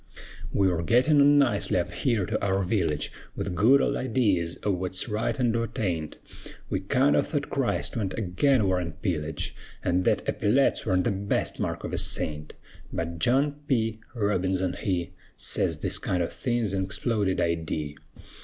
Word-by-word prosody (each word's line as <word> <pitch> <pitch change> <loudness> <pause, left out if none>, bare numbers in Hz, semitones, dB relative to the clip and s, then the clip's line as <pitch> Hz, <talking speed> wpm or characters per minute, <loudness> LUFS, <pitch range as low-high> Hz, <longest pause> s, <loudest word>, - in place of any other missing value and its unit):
We 95 - +3
were 85 -2 0
gittin' 130 - +4
on 145 +1 +6
nicely 120 -11 +2
up 90 - -1
here 115 -8 0
to - - -2
our 95 0 +1
village, 85 -6 0 0.2
With 95 - -3
good 120 +10 +5
old - - +1
idees 100 -11 0
o' 105 - +1
wut's 95 0 -2
right 110 +3 -1
an' 120 -2 +3
wut 115 -1 -2
aint, 85 -7 -2 0.5
We 95 - +1
kind 130 +9 +2
o' - - +5
thought 145 -2 -3
Christ 135 -3 0
went 100 -5 -2
agin 115 +5 +2
war 95 -1 +2
an' 85 -2 -5
pillage, 80 -5 -3 0.3
An' 90 +1 +2
thet - - +1
eppyletts 125 +3 +1
worn't 90 -2 +2
the - - +1
best 100 +1 -1
mark - - -2
of - - -5
a - - +1
saint; 75 -1 -1 0.4
But 85 0 -4
John 140 - +2
P. 115 -4 0 0.2
Robinson 95 -4 0
he 90 -3 -2 0.3
Sez - - 0
this - - -1
kind 90 -1 0
o' - - -1
thing's 120 -4 -2
an 95 -1 0
exploded 100 0 -1
idee. 80 -3 -1
100 Hz, 170 wpm, -27 LUFS, 90-120 Hz, 0.5 s, on